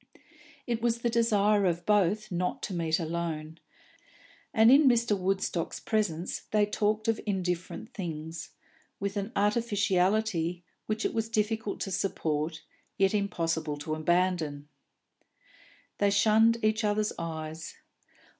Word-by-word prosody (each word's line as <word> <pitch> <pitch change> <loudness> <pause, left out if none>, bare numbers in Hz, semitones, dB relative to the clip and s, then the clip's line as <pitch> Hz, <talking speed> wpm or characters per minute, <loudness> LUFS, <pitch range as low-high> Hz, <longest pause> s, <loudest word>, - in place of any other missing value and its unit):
It 235 -2 -2
was 235 0 0
the 235 - +1
desire 210 -3 +3
of 175 0 -1
both 210 +1 +2
not 180 0 -2
to - - -3
meet 165 -2 0
alone, 160 -1 -4 0.9
and 225 +1 +6
in 285 +1 +7
Mr. 235 -3 +3
Woodstock's 190 -3 -1
presence 190 -6 -1
they 210 -1 +3
talked 210 +1 0
of 225 -1 +1
indifferent 185 +4 -3
things, 165 -5 -6 0.5
with 200 +1 -3
an 200 +2 -3
artificiality 200 -4 +1 0.2
which 215 +1 -2
it - - 0
was 225 0 -1
difficult 220 -1 -1
to 195 - -3
support, 160 -4 -2 0.3
yet 195 0 +3
impossible 165 -7 -1
to 150 +2 -4
abandon. 155 -3 0 1.3
They 205 - +4
shunned 220 +3 +4
each 215 +1 +2
other's 210 0 +1
eyes. 160 -1 -5
200 Hz, 125 wpm, -29 LUFS, 170-215 Hz, 1.3 s, in